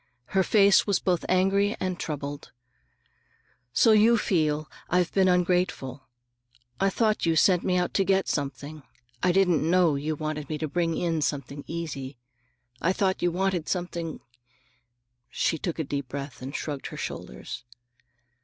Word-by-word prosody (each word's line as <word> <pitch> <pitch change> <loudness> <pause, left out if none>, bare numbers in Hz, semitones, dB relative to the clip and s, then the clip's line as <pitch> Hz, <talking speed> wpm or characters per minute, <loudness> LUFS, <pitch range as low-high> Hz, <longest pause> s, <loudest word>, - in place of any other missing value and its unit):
Her 190 - +4
face 200 +1 +5
was 200 -3 +3
both 180 -2 0
angry 195 +3 +2
and 185 -1 -2
troubled. 145 -1 -5 1.2
"So 225 - +5
you 215 +2 +6
really - - +4
feel 155 -4 0 0.2
I've 180 0 +1
been 190 -1 +4
ungrateful. 180 -7 0 0.7
I 195 - +3
thought 215 -2 +1
you 165 - +3
sent 180 +2 +4
me 180 -1 +1
out 180 0 0
to 195 - +3
get 195 0 +2
something. 145 +1 -4 0.4
I 180 - +3
didn't 180 -3 +3
know 170 0 +3
you 150 +3 -2
wanted 155 -1 -4
me 155 - -2
to 155 - -3
bring 165 +2 -1
in 165 -2 0
something 140 -1 -3
easy. 145 -6 -5 0.6
I 175 +4 +2
thought 190 -1 0
you 175 - +3
wanted 180 -1 -1
something—" 175 -3 -3 1.1
She 160 - 0
took 170 +1 -3
a 160 - -1
deep 140 -2 -4
breath 140 0 -7
and 135 +3 -6
shrugged 145 -3 -4
her - - -8
shoulders. 60 - -6
170 Hz, 155 wpm, -26 LUFS, 150-185 Hz, 1.2 s, you